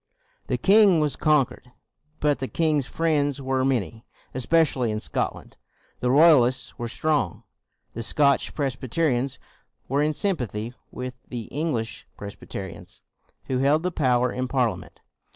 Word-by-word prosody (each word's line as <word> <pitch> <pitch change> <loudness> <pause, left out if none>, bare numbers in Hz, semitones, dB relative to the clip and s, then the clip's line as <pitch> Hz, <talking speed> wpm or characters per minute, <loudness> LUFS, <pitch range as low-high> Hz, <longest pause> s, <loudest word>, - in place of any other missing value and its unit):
The - - 0
king 200 -3 +5
was 150 -3 0
conquered, 140 -4 +1 0.5
but 145 -2 +1
the 130 - -3
king's 155 -4 +1
friends 145 -4 0
were 130 -1 0
many. 115 -5 -1 0.3
Especially 130 -2 +2
in 105 0 -2
Scot - - -2
land, - - -15 0.4
the 125 - 0
Royalists 135 -3 +5
were 120 - -3
strong. 140 -4 -1 0.5
The 115 - -5
Scotch 140 +4 +2
Presbyterians 135 -1 -1 0.5
were 140 +2 +1
in 150 0 +1
sympathy 120 - -2 0.2
with 125 0 -6
the 120 -2 -4
English 145 -7 -3
Presbyterians 100 -1 -9 0.4
who 130 -1 -1
held 145 +4 +3
the 180 - 0
power 125 -5 +2
in 130 0 -2
Parliament. 115 -9 -2
135 Hz, 135 wpm, -25 LUFS, 120-150 Hz, 0.5 s, king